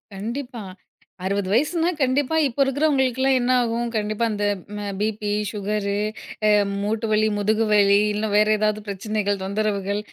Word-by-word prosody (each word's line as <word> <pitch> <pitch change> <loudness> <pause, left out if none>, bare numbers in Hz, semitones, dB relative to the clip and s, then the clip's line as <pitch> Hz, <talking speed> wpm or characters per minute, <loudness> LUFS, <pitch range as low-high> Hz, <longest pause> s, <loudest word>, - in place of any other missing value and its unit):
கண்டிப்பா, 240 +4 -5 0.6
60 200 0 -1
வயசுனா, 320 +8 +2
கண்டிப்பா 270 +3 +1
இப்ப 260 +1 -8
இருக்குறவங்களுக்கெல்லாம் 270 -2 +2
என்ன 245 +1 +1
ஆகும்? 235 0 -1
கண்டிப்பா, 215 +1 0
அந்த 205 -1 -2 0.4
அ - - -4
பிபி, 210 0 -2 0.2
சுகரு, 205 -1 -2 0.5
அ - - +5 0.3
மூட்டு 220 +2 -1
வலி, 215 0 +3
முதுகு 215 +2 +1
வலி 200 -1 +5 0.2
இல்ல 210 +1 -1
வேற 210 +1 +5
ஏதாவது 215 0 0
பிரச்சனைகள், 205 0 -2
தொந்தரவுகள். 200 0 -1
215 Hz, 135 wpm, -23 LUFS, 205-245 Hz, 0.6 s, அ